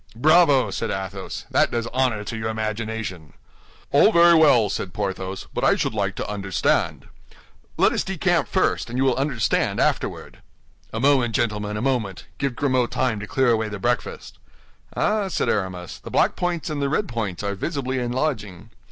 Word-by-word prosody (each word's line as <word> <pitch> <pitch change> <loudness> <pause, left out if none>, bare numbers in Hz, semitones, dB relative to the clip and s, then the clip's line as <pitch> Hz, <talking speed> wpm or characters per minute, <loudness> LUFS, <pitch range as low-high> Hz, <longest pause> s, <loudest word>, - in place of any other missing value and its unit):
"Bravo!" 150 +1 +4
said 115 - -3
Athos; 95 0 -5
"that - - +3
does 115 -1 -2
honor 125 -5 +1
to 110 - -5
your 110 0 -3
imagination." 110 -6 -4 0.6
"All - - +6
very 170 0 +6
well," 145 -9 +5
said 95 -2 -4
Porthos, 95 -2 -4
"but - - -3
I - - +5
should - - -1
like 100 -2 -1
to - - -4
understand." 100 -2 -1 0.7
"Let - - +4
us - - -1
decamp - - 0
first, - - 0
and 120 - -4
you 130 - +2
will 130 -2 +3
understand 135 -5 0
afterward." - - -1 0.5
"A 110 - -3
moment, 130 -4 +3
gentlemen, 105 -2 -1
a 105 - -3
moment; 120 -8 -1
give 140 -3 -1
Grimaud 130 -3 +1
time 125 -5 -1
to 105 - -7
clear 130 +2 +2
away 110 -1 0
the 105 - -5
breakfast." 120 +5 -3 0.6
"Ah, 210 -1 +1
ah!" - - -3
said 190 - -1
Aramis, 95 -4 -3
"the - - -10
black - - +2
points 175 -2 -2
and 145 -2 -3
the 140 - 0
red 180 +8 0
points 105 -6 -4
are 100 0 -1
visibly 130 - -3
enlarging. 120 - -3
115 Hz, 180 wpm, -23 LUFS, 105-135 Hz, 0.7 s, All